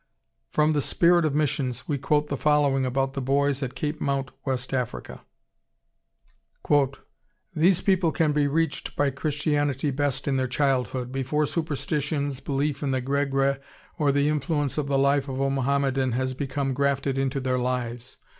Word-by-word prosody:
] - - -51
From 155 0 +4
the 145 - +1
Spirit 170 +3 +3
of 150 -2 0
Missions 140 -4 -1
we 145 -3 -1
quote 150 +2 +1
the 145 - -3
following 140 -2 +2
about 135 +1 0
the 135 - -3
boys 140 +1 +1
at 130 -2 -4
Cape 150 0 -3
Mount, 135 -1 -1
West 130 -1 -3
Africa: 120 - -3 2.3
"These 175 +3 +3
people 185 -4 +2
can 155 -2 +1
be 145 -1 +2
reached 160 +1 -1
by 145 -1 +2
Christianity 145 0 0
best 140 0 -1
in 135 -1 +1
their 130 0 0
childhood, 130 -2 0
before 135 +3 0
superstitions, 145 -2 -2
belief 140 +1 -2
in 145 - -1
the 130 -1 +1
Gregre, 135 +1 0 0.4
or 145 -2 +3
the 140 +1 +2
influence 150 -1 0
of 145 - -2
the 140 -1 +1
life 140 0 +2
of 130 0 -4
a 135 0 +1
Mohammedan 135 -1 +1
has 130 +1 -1
become 135 0 -2
grafted 140 0 0
into 135 0 0
their 130 -1 0
lives. 125 0 -3
140 Hz, 165 wpm, -25 LUFS, 135-150 Hz, 2.3 s, From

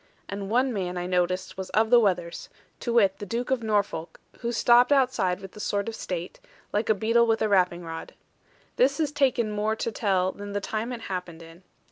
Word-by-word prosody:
And 200 -1 -5
one 250 +3 +2
man 180 -3 -3
I 175 - -3
noticed 185 +1 -1
was 190 - -5
of 220 +1 +3
the 245 - +8
wethers, 180 -6 -1 0.3
to 235 - -2
wit 200 -5 +3
the 205 - -5
Duke 240 +5 -3
of 260 -2 +1
Norfolk; 200 -7 -1 0.2
who 235 0 -2
stopped 240 +2 +5
outside 200 -9 +2
with 195 -1 -9
the - - -13
sword 205 0 -1
of 230 - -3
state, 180 - -5 0.3
like 210 +2 0
a 220 - +5
beadle 230 +3 +3
with 225 -1 +2
a - - +2
rapping 180 -3 +2
rod. 165 0 -7 0.6
This - - +3
has 310 -3 0
taken 260 -6 +1
more 210 +1 0
to 230 - -3
tell 190 -4 +1
than 205 +1 -8
the 205 - 0
time 220 +4 -3
it 240 -2 -5
happened 180 -5 -6
in. 165 +2 -14
205 Hz, 210 wpm, -26 LUFS, 185-235 Hz, 0.6 s, the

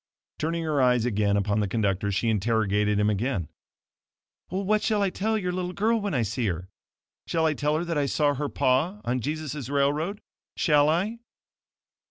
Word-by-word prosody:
Turning 165 +2 -1
her 150 -3 +1
eyes 125 -2 +3
again 105 -3 +1
upon 100 +1 +1
the 105 - +1
conductor, 100 -1 0
she 100 +4 0
interrogated 105 -1 +1
him 105 - +3
again, 105 - -1 1.0
"What 200 +3 0
shall 210 -2 +1
I 195 - +1
tell 220 +4 0
your 180 -4 -2
little 180 0 -3
girl 225 +3 +1
when 200 -6 -2
I 120 - +2
see 110 +2 -1
her? 90 0 -4 0.6
Shall 165 -1 +1
I 155 - +3
tell 150 +1 0
her 170 - -2
that 165 -3 -1
I 140 - +1
saw 145 0 +2
her 145 +1 -3
pa 155 +11 +1
on 125 +1 0
Jesus' 150 -1 -4
railroad? 145 +8 0 0.4
Shall 150 -2 +4
I?" 195 +9 0
145 Hz, 180 wpm, -26 LUFS, 110-170 Hz, 1.0 s, Shall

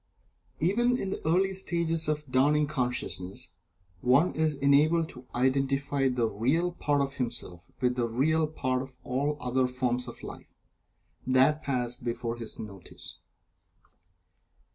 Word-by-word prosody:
Even 240 +9 +2
in 195 -6 -3
the - - -4
early 190 +4 +3
stages 170 -4 0
of 150 0 0
this - - -21
dawning 145 +3 +3
consciousness, 125 -9 -3 0.5
one 130 - +4
is 155 -1 +1
enabled 150 +4 +3
to 125 -3 -12
identify 135 +2 +1
the 125 -2 +1
real 135 - +1
part 145 -4 0
of 135 -1 -1
himself 120 -9 -4
with 125 -1 +2
the 120 -2 0
real 155 +7 +2
part 130 -4 -1
of 130 -1 -10
all 140 +4 0
the - - -17
other 125 +1 +2
forms 125 0 -1
of 120 - -9
life - - -9 0.7
that 130 +4 +4
pass 125 -4 0
before 120 -1 -3
his 115 -2 -4
notice. 100 -4 -7
135 Hz, 140 wpm, -29 LUFS, 125-155 Hz, 0.7 s, one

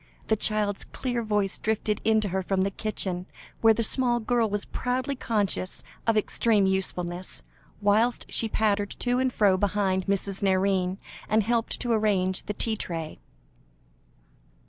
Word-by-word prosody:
The 220 - +4
child's 210 -1 0
clear 245 -2 -3
voice 210 -3 0
drifted 215 -1 -1
in 220 0 +3
to 205 - -2
her 190 +1 -1
from 190 +1 0
the 195 +1 +1
kitchen, 190 -3 -2 0.3
where 225 -1 +6
the 230 - 0
small 240 +1 +2
girl 235 -1 +1
was 205 0 -1
proudly 255 +2 -2
conscious 205 -6 -1 0.2
of 225 -1 +3
extreme 215 -1 +2
usefulness, 180 -2 -2 0.4
whilst 220 +4 +2
she 225 - +1
pattered 205 -2 +1
to 245 0 +1
and 260 0 +1
fro 200 -5 +3
behind 190 -1 0
Mrs. 195 0 -1
Nairne, 190 -1 +1 0.3
and 215 0 +3
helped 230 +1 0
to 240 - -1
arrange 200 -4 +1
the 210 - -1
tea 220 +2 -1
tray. 165 -6 -5
210 Hz, 150 wpm, -27 LUFS, 190-225 Hz, 0.4 s, where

